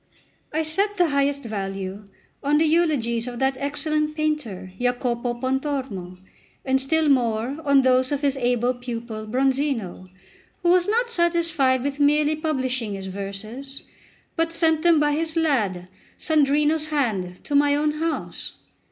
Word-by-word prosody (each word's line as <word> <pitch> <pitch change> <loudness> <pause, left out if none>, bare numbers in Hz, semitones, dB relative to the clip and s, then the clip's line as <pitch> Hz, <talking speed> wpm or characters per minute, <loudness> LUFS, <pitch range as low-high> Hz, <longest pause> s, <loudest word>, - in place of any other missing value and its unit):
I 315 +1 0
set 395 +7 0
the 350 -3 +3
highest 280 0 +1
value 195 -2 -5 0.4
on 290 +1 +2
the 320 - +3
eulogies 285 -8 +1
of 245 -1 -5
that 265 +1 +1
excellent 305 +2 -1
painter 275 -13 -2
Jacopo 245 -1 -1
Pontormo, 260 -8 -3 0.5
and 265 0 +2
still 315 +3 +1
more 245 0 +1
on 280 -2 +4
those 255 0 +3
of 285 -1 -1
his 280 -2 +1
able 245 -1 +1
pupil 235 -3 -6
Bronzino, 260 -6 -1 0.6
who 345 - +3
was 360 +1 +4
not 470 +3 +1
satisfied 335 - +2
with 285 +1 -3
merely 295 +1 +3
publishing 260 -8 -2
his 195 -1 -7
verses, 205 +8 -6 0.5
but 330 0 0
sent 320 -2 +2
them 335 -2 +5
by 295 0 +2
his 320 +2 -1
lad 210 - +1 0.3
Sandrino's 300 +1 +2
hand 215 -12 -1
to - - -6
my 285 0 +4
own 300 +1 +1
house. 320 +2 -4
275 Hz, 145 wpm, -23 LUFS, 235-310 Hz, 0.6 s, them